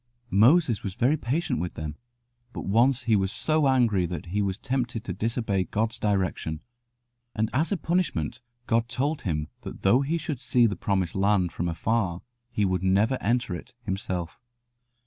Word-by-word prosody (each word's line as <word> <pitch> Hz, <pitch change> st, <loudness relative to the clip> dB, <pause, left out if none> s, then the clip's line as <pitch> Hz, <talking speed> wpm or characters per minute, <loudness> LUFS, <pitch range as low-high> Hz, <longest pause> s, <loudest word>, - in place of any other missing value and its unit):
Moses 120 Hz, -, +5 dB
was 95 Hz, -2 st, -5 dB
very 130 Hz, +8 st, +3 dB
patient 145 Hz, -, -1 dB
with 90 Hz, +1 st, -3 dB
them; 75 Hz, -1 st, -5 dB, 0.6 s
but -, -, -5 dB
once 120 Hz, +5 st, +3 dB
he 115 Hz, -2 st, +3 dB
was 95 Hz, -1 st, +1 dB
so 155 Hz, +2 st, +1 dB
angry 115 Hz, -9 st, +3 dB
that 85 Hz, -2 st, -5 dB
he 100 Hz, +4 st, -1 dB
was 95 Hz, -1 st, -1 dB
tempted 125 Hz, -3 st, -2 dB
to -, -, -4 dB
disobey 110 Hz, -4 st, -1 dB
God's 110 Hz, +6 st, -1 dB
direction, 95 Hz, -6 st, -1 dB, 0.7 s
and 110 Hz, +1 st, 0 dB
as 155 Hz, +8 st, +1 dB
a 200 Hz, -, +1 dB
punishment 155 Hz, -, -1 dB, 0.2 s
God 115 Hz, 0 st, +1 dB
told 140 Hz, +5 st, -1 dB
him 75 Hz, -5 st, -2 dB
that -, -, -9 dB
though 120 Hz, +7 st, +5 dB
he 150 Hz, +5 st, 0 dB
should 155 Hz, -4 st, -4 dB
see 120 Hz, -1 st, +3 dB
the 105 Hz, -4 st, +1 dB
Promised 95 Hz, -1 st, -1 dB
Land 95 Hz, -3 st, +2 dB
from 85 Hz, -, -2 dB
afar 90 Hz, 0 st, -1 dB, 0.3 s
he 105 Hz, -4 st, 0 dB
would 95 Hz, -2 st, 0 dB
never 100 Hz, +7 st, +2 dB
enter 120 Hz, -2 st, 0 dB
it 120 Hz, +8 st, -8 dB
himself. 90 Hz, -4 st, -3 dB
110 Hz, 170 wpm, -26 LUFS, 95-125 Hz, 0.7 s, Moses